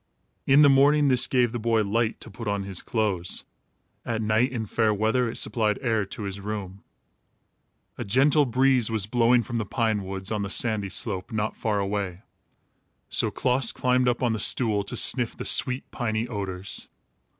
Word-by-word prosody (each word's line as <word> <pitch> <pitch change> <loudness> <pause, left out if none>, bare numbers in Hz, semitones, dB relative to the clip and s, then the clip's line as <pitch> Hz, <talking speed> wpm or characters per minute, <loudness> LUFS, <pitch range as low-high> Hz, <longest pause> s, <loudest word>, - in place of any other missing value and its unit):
In 140 +2 +6
the - - +7
morning, 140 +2 +4
this 125 -2 +3
gave 125 -3 +2
the 120 - -4
boy 115 -1 +1
light 110 +2 -1
to 115 - -9
put 115 +2 -8
on 100 -1 -1
his 95 -2 -4
clothes. 100 -7 -2 0.6
At 115 -2 -3
night, 110 +4 +1
in 115 -4 -3
fair 110 +1 +1
weather, 110 +4 +1
it 115 - -5
supplied 110 -3 +1
air 110 -5 0
to 105 - -7
his 100 0 -5
room. 100 -2 -6 1.2
A - - -2
gentle 140 +7 +3
breeze 130 -1 +2
was 110 -3 0
blowing 120 +2 +3
from 120 +2 -4
the - - -1
pine 110 -1 -1
woods 95 +1 -6
on 105 -2 -1
the 100 - -3
sandy 105 -1 0
slope, 90 0 -3
not 110 -1 -2
far 110 -2 -1
away. 100 -1 -3 0.9
So - - +1
Klaas 125 -1 +1
climbed 125 0 +1
up 120 +1 0
on 120 -2 +2
the 110 - -3
stool 105 -1 +3
to - - -4
sniff 120 -3 +1
the - - -6
sweet 125 +1 0
piny 115 -1 -2
odors. 100 -4 -5
110 Hz, 185 wpm, -25 LUFS, 100-125 Hz, 1.2 s, the